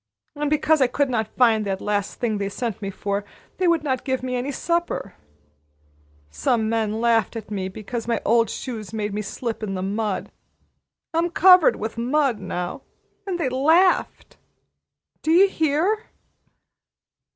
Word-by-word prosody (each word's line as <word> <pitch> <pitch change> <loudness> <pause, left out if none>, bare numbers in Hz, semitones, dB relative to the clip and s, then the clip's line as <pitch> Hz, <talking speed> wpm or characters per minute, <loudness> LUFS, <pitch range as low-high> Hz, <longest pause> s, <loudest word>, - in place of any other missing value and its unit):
And 295 0 -1
because 305 0 +2
I 260 - +5
could 280 +1 0
not 220 -3 -2
find 225 -4 +4
that 195 -1 -2
last 205 -1 -2
thing 220 -4 -1
they 200 -1 -2
sent 220 0 -4
me 195 - -3
for, 200 +1 -3 0.3
they 370 - +1
would 335 -3 +2
not 260 -4 -1
give 260 -2 -2
me 255 -1 -2
any 250 +3 -2
supper. 340 +4 -2 1.2
Some 220 - 0
men 220 -1 -1
laughed 230 -2 +2
at 215 -2 -7
me 190 -2 -2
because 220 +4 -6
my 230 -2 +1
old 230 +1 +3
shoes 220 -7 -6
made 210 -2 -3
me 210 - -2
slip 225 +3 -4
down 215 - -4
in 195 - -3
the 185 - -3
mud. 205 +1 -2 0.8
I'm 335 +2 +1
covered 365 -1 +6
with 220 +2 -5
mud 260 -1 +1
now. 180 -2 -4 0.5
And 360 -2 -2
they 310 - 0
laughed! 320 +9 +2 0.8
Do - - -3
you 360 +5 +6
hear!" 340 +6 0
235 Hz, 160 wpm, -23 LUFS, 210-295 Hz, 1.2 s, covered